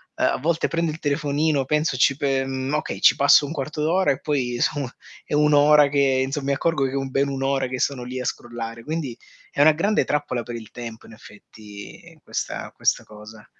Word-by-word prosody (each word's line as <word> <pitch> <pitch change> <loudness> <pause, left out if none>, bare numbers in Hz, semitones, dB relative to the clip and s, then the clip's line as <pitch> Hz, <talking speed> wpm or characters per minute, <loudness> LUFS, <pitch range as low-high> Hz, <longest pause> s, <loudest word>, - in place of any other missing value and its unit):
eh, - - -2
a - - +2
volte 165 +5 0
prendo 165 -1 0
il 155 - -8
telefonino 145 -1 0
penso 150 -1 0
ci 135 +2 +3
pe 135 -2 0
mhmm, 135 +1 -3
okay, 150 - -3
ci - - +6
passo 140 0 +6
un 145 - -6
quarto 150 0 -4
d'ora, 175 +4 +2
e 135 - -2
poi 130 -5 -1
so 140 -4 0 0.4
è - - -6
1 150 0 +3
ora 145 0 +6
che, 135 -2 +2
insomma, 135 +1 -3
mi 140 - +2
accorgo 140 0 0
che 130 - -2
è - - -5
un 135 -1 -2
bene 140 +1 0
1 135 0 -3
ora 135 -1 0
che 130 0 -5
sono 135 -2 -1
lì 125 +1 -5
a - - -6
scrollare. 115 -1 -5
Quindi 150 -5 -4 0.3
è - - -7
una 155 +2 +7
grande 200 +7 +1
trappola 145 -4 -1
per 120 +1 -7
il 110 -2 -9
tempo, 115 -2 -9
in - - -14
effetti, 105 -1 -13
questa - - -5
questa - - 0
cosa. 105 0 -13
140 Hz, 220 wpm, -23 LUFS, 125-150 Hz, 0.4 s, una